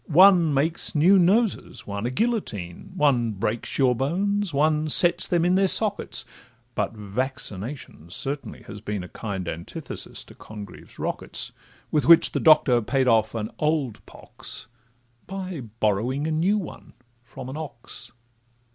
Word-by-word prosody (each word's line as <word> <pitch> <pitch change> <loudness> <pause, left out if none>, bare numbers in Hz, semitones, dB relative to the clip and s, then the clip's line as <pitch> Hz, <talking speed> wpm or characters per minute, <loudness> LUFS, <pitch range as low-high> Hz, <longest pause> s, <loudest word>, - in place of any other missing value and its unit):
One 175 -1 +6
makes 155 +5 0
new 180 +6 +6
noses, 205 +5 +1
one 100 +3 -3
a - - -1
guillotine, 130 - -2
One 125 - +2
breaks 105 +3 -2
your 130 -3 +4
bones, 195 - 0
one 155 +1 +1
sets 175 +3 +4
them 170 -1 +2
in 180 - +3
their 195 +1 +4
sockets; 205 +1 +1 0.5
But - - -1
vaccination 105 - -5
certainly 140 +10 -5
has 100 0 -10
been 105 -3 -4
A - - -8
kind 95 -5 -5
antithesis 85 +1 -6
to - - -15
Congreve's 105 -3 -11
rockets, - - -4 0.4
With 150 - +1
which 170 0 +7
the - - -1
Doctor 150 -6 +5
paid 130 +4 0
off 110 -1 +3
an 110 -1 -3
old 150 -7 -1
pox, - - -7 0.6
By 185 -5 -5 0.2
borrowing 115 +8 0
a 160 - -1
new 175 +7 +2
one 195 - -8 0.3
from 125 +1 -10
an 130 - -6
ox. 125 -4 -9
140 Hz, 145 wpm, -25 LUFS, 110-170 Hz, 0.6 s, which